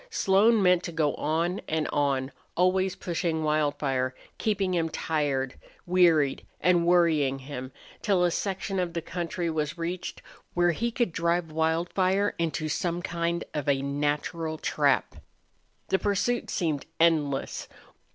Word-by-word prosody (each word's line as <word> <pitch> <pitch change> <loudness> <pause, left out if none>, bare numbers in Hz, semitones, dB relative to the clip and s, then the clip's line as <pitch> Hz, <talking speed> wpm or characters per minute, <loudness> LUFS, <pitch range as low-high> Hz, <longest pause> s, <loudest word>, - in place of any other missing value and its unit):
Slone 205 +3 +4
meant 180 -1 +5
to 170 - -4
go 155 -3 +1
on 165 +5 -1
and 155 -1 0
on, 140 -2 0 0.3
always 185 +1 +2
pushing 165 -2 -2
Wildfire, 145 -4 0 0.2
keeping 200 -4 0
him 165 -2 +1
tired, 145 -5 -1 0.3
wearied, 170 -6 +3 0.2
and 175 -1 +3
worrying 160 -6 +3
him, 130 -1 -7 0.3
till 195 -5 +2
a 175 - +3
section 195 +1 -2
of 175 -2 -1
the 170 - -2
country 175 +1 -3
was 160 0 -2
reached 175 +2 -4 0.3
where 175 0 +4
he 230 +8 -1
could 235 -4 0
drive 170 0 0
Wildfire 175 +5 +1
into 160 -1 -1
some 175 +3 -1
kind 170 -1 -1
of 145 -2 -2
a 135 -1 +2
natural 150 +3 -1
trap. - - +1 0.7
The 190 - +2
pursuit 210 +4 0
seemed 155 -6 -1
endless. 155 -5 +1
170 Hz, 135 wpm, -27 LUFS, 150-180 Hz, 0.7 s, meant